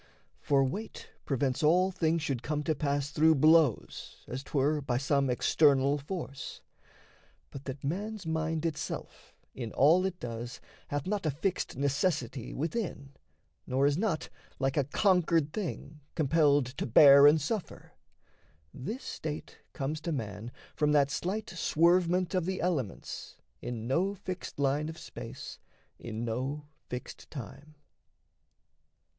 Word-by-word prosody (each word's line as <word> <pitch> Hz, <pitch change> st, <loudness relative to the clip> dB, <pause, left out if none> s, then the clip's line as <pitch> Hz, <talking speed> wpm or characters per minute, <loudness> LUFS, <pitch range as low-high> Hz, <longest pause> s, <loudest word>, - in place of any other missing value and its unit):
For 140 Hz, -1 st, +3 dB
weight 200 Hz, +12 st, -5 dB
prevents 135 Hz, -1 st, 0 dB
all 180 Hz, +5 st, +4 dB
things 165 Hz, -3 st, 0 dB
should 135 Hz, -6 st, -1 dB
come 150 Hz, +2 st, -2 dB
to 155 Hz, -, +1 dB
pass 145 Hz, -1 st, -1 dB
Through 160 Hz, +2 st, +4 dB
blows, 155 Hz, -3 st, +2 dB
as 130 Hz, +2 st, -4 dB
'twere, 145 Hz, +2 st, 0 dB
by 125 Hz, -3 st, -1 dB
some 140 Hz, 0 st, +1 dB
external 140 Hz, +2 st, +3 dB
force; 140 Hz, -3 st, -6 dB, 0.9 s
But 140 Hz, 0 st, -9 dB
that 135 Hz, 0 st, -6 dB
man's 200 Hz, +7 st, -3 dB
mind 160 Hz, 0 st, -1 dB
itself 155 Hz, -2 st, -5 dB, 0.2 s
in 120 Hz, -4 st, -5 dB
all 160 Hz, +7 st, +5 dB
it 185 Hz, -2 st, -6 dB
does 120 Hz, 0 st, -6 dB, 0.3 s
Hath 145 Hz, -1 st, -3 dB
not 200 Hz, -3 st, -1 dB
a -, -, +3 dB
fixed 165 Hz, +1 st, -2 dB
necessity 140 Hz, -3 st, -1 dB
within, 160 Hz, -, -3 dB, 0.6 s
Nor 135 Hz, +2 st, +2 dB
is 145 Hz, 0 st, +3 dB
not, 180 Hz, -4 st, -1 dB, 0.3 s
like 135 Hz, 0 st, 0 dB
a 145 Hz, -, +2 dB
conquered 165 Hz, -2 st, +2 dB
thing, 160 Hz, -6 st, -5 dB, 0.2 s
compelled 145 Hz, -3 st, +3 dB
To -, -, -1 dB
bear 140 Hz, +4 st, +9 dB
and 155 Hz, +2 st, +6 dB
suffer, 185 Hz, +7 st, -4 dB, 0.8 s
this 215 Hz, -, -5 dB
state 155 Hz, -1 st, -6 dB
comes 150 Hz, +3 st, -3 dB
to 170 Hz, -, -3 dB
man 115 Hz, -4 st, -4 dB, 0.2 s
From 150 Hz, -1 st, +2 dB
that 140 Hz, -2 st, +4 dB
slight 200 Hz, +9 st, -2 dB
swervement 175 Hz, +2 st, +2 dB
of 180 Hz, -2 st, 0 dB
the 190 Hz, -1 st, -2 dB
elements 150 Hz, -, -3 dB, 0.3 s
In 115 Hz, -2 st, -5 dB
no 180 Hz, +11 st, +1 dB
fixed 185 Hz, -2 st, -6 dB
line 140 Hz, +2 st, +1 dB
of 160 Hz, -, -8 dB
space, -, -, -8 dB, 0.4 s
in 115 Hz, 0 st, -5 dB
no 130 Hz, +6 st, -3 dB, 0.2 s
fixed 125 Hz, 0 st, -7 dB
time. 145 Hz, +3 st, -9 dB
150 Hz, 135 wpm, -30 LUFS, 135-170 Hz, 0.9 s, bear